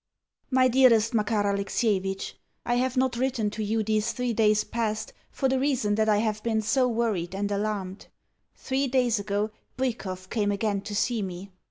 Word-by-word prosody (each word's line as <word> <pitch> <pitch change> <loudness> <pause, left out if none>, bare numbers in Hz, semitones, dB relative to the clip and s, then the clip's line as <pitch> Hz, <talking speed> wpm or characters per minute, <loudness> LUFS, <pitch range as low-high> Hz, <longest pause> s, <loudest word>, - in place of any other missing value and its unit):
MY 260 -1 +4
DEAREST 240 -3 +4
MAKAR 210 -1 +1
ALEXIEVITCH, 200 -1 -1 0.3
I 240 - +1
have 255 +1 0
not 255 -2 +1
written 245 -5 0
to 215 +1 -4
you 220 +1 0
these 215 +1 0
three 250 -1 -1
days 215 -1 +3
past 220 -2 -3 0.2
for 270 - -1
the 265 0 +1
reason 260 -6 +1
that 220 +1 +2
I 210 - +4
have 215 0 -1
been 220 -1 0
so 250 +4 +2
worried 220 -7 -1
and 205 +1 -2
alarmed. 200 -2 -3 0.5
Three 270 +1 -1
days 245 -4 +2
ago 205 +1 -1 0.3
Bwikov 195 -8 -3
came 205 -3 +1
again 200 0 -1
to 205 +1 -6
see 225 +1 0
me. 190 0 -6
220 Hz, 175 wpm, -26 LUFS, 205-245 Hz, 0.5 s, MY